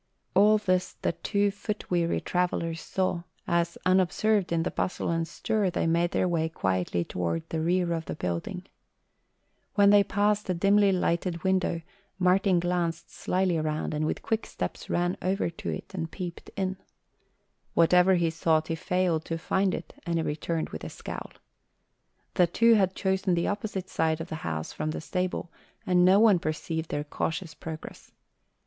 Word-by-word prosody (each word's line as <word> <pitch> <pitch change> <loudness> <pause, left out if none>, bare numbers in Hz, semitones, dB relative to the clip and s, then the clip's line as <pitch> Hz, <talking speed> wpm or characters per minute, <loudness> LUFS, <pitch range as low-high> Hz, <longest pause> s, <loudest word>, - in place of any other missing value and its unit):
All 210 +3 +6
this 185 -3 0
the - - +2
two 200 +4 0
foot 210 +1 -5
weary 170 -1 +1
travellers 170 -2 -1
saw, 185 -2 -1 0.2
as 170 0 0
unobserved 190 +2 +2
in 165 -1 +1
the - - -2
bustle 180 - -1
and 165 -1 0
stir, 210 +3 0
they 175 - -1
made 170 +1 +2
their 185 - +1
way 165 -2 0
quietly 95 - -1
toward 85 -2 -3
the 160 - -2
rear 175 +1 +1
of 165 -1 -3
the - - -4
building. 120 - -3 1.1
When 200 -2 +6
they 205 -1 +7
passed 205 +1 +1
a 185 - +1
dimly 200 +3 +4
lighted 175 -2 0
window 185 -3 +1 0.4
Martin 185 0 +3
glanced 170 -1 -1
slyly 185 -2 0
around 155 0 -2
and 155 +1 0
with - - -3
quick 225 -1 -1
steps - - -5
ran 175 +1 0
over 185 -1 0
to 165 - -6
it - - -5
and 165 -3 -3
peeped 175 -2 -7
in. 190 -1 -1 1.0
Whatever 180 +3 +5
he 170 -2 +1
sought, 160 -1 +1
he - - 0
failed 180 -2 0
to 165 - -2
find 190 +3 +1
it, - - -8
and 170 -1 -2
he 165 - +1
returned 160 +2 -2
with 80 - -7
a - - -5
scowl. - - -7 1.0
The 180 - +4
two 230 +7 +4
had 190 -4 +3
chosen 190 -2 +1
the 170 - 0
opposite 205 -2 -3
side 160 -3 0
of 165 +2 -6
the 160 - -3
house 80 -1 -4
from 155 - -3
the 155 - -3
stable 180 0 -2 0.3
and 180 -1 +4
no 190 +2 +6
one 210 -5 +6
perceived 160 +1 -3
their 145 - -2
cautious 160 +3 -3
progress. 160 -1 -9
175 Hz, 170 wpm, -28 LUFS, 165-190 Hz, 1.1 s, they